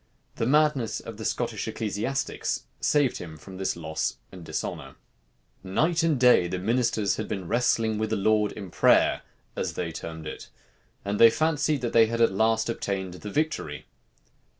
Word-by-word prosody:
The 115 Hz, -, 0 dB
madness 150 Hz, -4 st, +2 dB
of -, -, -9 dB
the -, -, -6 dB
Scottish -, -, -2 dB
ecclesiastics 110 Hz, +6 st, -2 dB, 0.2 s
saved 145 Hz, -4 st, +2 dB
him 80 Hz, -3 st, -8 dB
from 95 Hz, +4 st, -11 dB
this 95 Hz, 0 st, -1 dB
loss 75 Hz, -7 st, -3 dB
and 90 Hz, -2 st, -10 dB
dishonor. -, -, -5 dB, 0.7 s
Night 160 Hz, -, +1 dB
and 160 Hz, -5 st, +1 dB
day 125 Hz, -8 st, +5 dB
the 90 Hz, -, -3 dB
ministers 110 Hz, 0 st, +1 dB
had 110 Hz, -, -3 dB
been 95 Hz, -4 st, -4 dB
wrestling 115 Hz, -1 st, +1 dB
with 110 Hz, 0 st, -1 dB
the -, -, 0 dB
Lord 105 Hz, +1 st, +2 dB
in 100 Hz, -5 st, -8 dB
prayer, -, -, +4 dB, 0.3 s
as -, -, -2 dB
they 85 Hz, -2 st, -3 dB
termed 80 Hz, 0 st, -7 dB
it; 75 Hz, -, -8 dB, 0.6 s
and 100 Hz, +1 st, -2 dB
they 115 Hz, -, +9 dB
fancied 155 Hz, +1 st, +1 dB
that 120 Hz, -, -2 dB
they 115 Hz, -1 st, +6 dB
had 115 Hz, +1 st, -3 dB
at 115 Hz, -, +4 dB
last 110 Hz, +3 st, +2 dB
obtained 95 Hz, -5 st, -3 dB
the 95 Hz, +3 st, -8 dB
victory. 105 Hz, -, -2 dB
110 Hz, 170 wpm, -26 LUFS, 95-125 Hz, 0.7 s, they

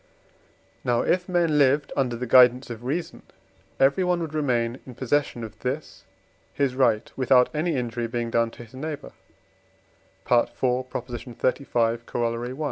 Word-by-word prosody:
Now, 120 Hz, -1 st, +2 dB
if 180 Hz, +1 st, 0 dB
men 170 Hz, -4 st, +2 dB
lived 140 Hz, +1 st, +3 dB
under 125 Hz, -3 st, 0 dB
the 125 Hz, +2 st, -4 dB
guidance 125 Hz, +1 st, +5 dB
of 115 Hz, 0 st, -8 dB
reason, 155 Hz, +7 st, -3 dB, 0.6 s
everyone 175 Hz, +6 st, +3 dB
would 160 Hz, -2 st, -5 dB
remain 125 Hz, -5 st, 0 dB
in 125 Hz, -, -9 dB
possession 130 Hz, -2 st, -1 dB
of 110 Hz, 0 st, -9 dB
this 135 Hz, +4 st, -5 dB, 0.5 s
his 140 Hz, -3 st, 0 dB
right, 120 Hz, -4 st, +1 dB
without 130 Hz, 0 st, +3 dB
any 155 Hz, +1 st, 0 dB
injury 120 Hz, -2 st, -2 dB
being 120 Hz, 0 st, -3 dB
done 115 Hz, 0 st, +2 dB
to 120 Hz, -, -11 dB
his 115 Hz, -, -17 dB
neighbour 150 Hz, +2 st, -6 dB, 1.1 s
(IV. 120 Hz, -1 st, +3 dB
xxxv. 125 Hz, -1 st, -1 dB
Coroll. 120 Hz, 0 st, -2 dB
i.). 130 Hz, +3 st, -8 dB
125 Hz, 140 wpm, -25 LUFS, 120-145 Hz, 1.1 s, guidance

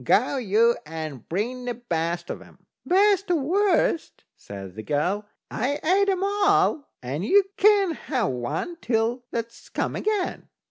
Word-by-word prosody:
"Go 250 Hz, -, +3 dB
you, 230 Hz, 0 st, +3 dB
and 155 Hz, -5 st, -7 dB
bring 245 Hz, +8 st, -2 dB
the 245 Hz, -1 st, -2 dB
best 170 Hz, -6 st, -2 dB
of -, -, -6 dB
'em." -, -, -18 dB, 0.2 s
"Best 395 Hz, +1 st, +3 dB
or 355 Hz, -, +4 dB
worst," 340 Hz, +2 st, +1 dB
says 95 Hz, -2 st, -9 dB
the 110 Hz, -, -7 dB
girl, 180 Hz, -, -1 dB, 0.2 s
"I've 270 Hz, +6 st, -1 dB
ate 395 Hz, +4 st, +3 dB
'em 380 Hz, -1 st, 0 dB
all, 400 Hz, -6 st, +2 dB
and 140 Hz, +7 st, -3 dB
you 400 Hz, -, +5 dB
can't 400 Hz, -5 st, +4 dB
have 250 Hz, -, -1 dB
one 145 Hz, -, -3 dB
till 235 Hz, +2 st, 0 dB
that's 230 Hz, 0 st, -5 dB
come -, -, -2 dB
again." 420 Hz, -3 st, -2 dB
245 Hz, 150 wpm, -25 LUFS, -, 0.2 s, you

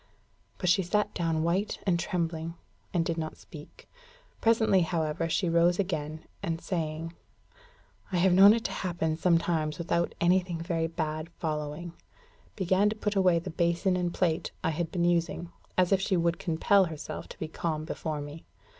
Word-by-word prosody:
But 180 Hz, -, -3 dB
she 180 Hz, +2 st, +4 dB
sat 210 Hz, +4 st, 0 dB
down 165 Hz, -2 st, 0 dB
white 185 Hz, +5 st, 0 dB
and 175 Hz, -3 st, +2 dB
trembling, 165 Hz, -1 st, -2 dB, 0.4 s
and 170 Hz, -3 st, +1 dB
did 165 Hz, 0 st, -1 dB
not 155 Hz, -1 st, -4 dB
speak. 150 Hz, -2 st, -13 dB, 0.5 s
Presently, 220 Hz, -4 st, +4 dB
however, 165 Hz, -1 st, -1 dB
she 170 Hz, +3 st, +1 dB
rose 170 Hz, +1 st, +3 dB
again, 160 Hz, -5 st, -2 dB, 0.2 s
and 165 Hz, 0 st, -2 dB
saying, 165 Hz, -2 st, -3 dB, 1.0 s
"I 180 Hz, -, +1 dB
have 180 Hz, +1 st, +4 dB
known 200 Hz, +4 st, +8 dB
it 230 Hz, -, -3 dB
happen 170 Hz, -3 st, -2 dB
sometimes 165 Hz, -2 st, +1 dB
without 170 Hz, 0 st, -1 dB
anything 175 Hz, -1 st, +2 dB
very 165 Hz, -1 st, -1 dB
bad 155 Hz, -1 st, -3 dB
following," 155 Hz, +1 st, -3 dB, 0.6 s
began 190 Hz, +1 st, +2 dB
to 215 Hz, -, -3 dB
put 210 Hz, -1 st, -2 dB
away 185 Hz, -3 st, +4 dB
the 175 Hz, +2 st, -4 dB
basin 170 Hz, +3 st, +1 dB
and 175 Hz, -1 st, 0 dB
plate 170 Hz, -3 st, 0 dB
I -, -, +1 dB
had 165 Hz, +1 st, -3 dB
been 175 Hz, -2 st, 0 dB
using, 170 Hz, 0 st, 0 dB, 0.3 s
as 185 Hz, 0 st, +3 dB
if 195 Hz, -1 st, +4 dB
she 195 Hz, -1 st, +1 dB
would 170 Hz, 0 st, +1 dB
compel 185 Hz, +4 st, +3 dB
herself 160 Hz, -3 st, -6 dB
to -, -, -10 dB
be 160 Hz, -, -4 dB
calm 155 Hz, -1 st, -3 dB
before 155 Hz, -2 st, -4 dB
me. 145 Hz, +2 st, -8 dB
170 Hz, 165 wpm, -29 LUFS, 160-185 Hz, 1.0 s, known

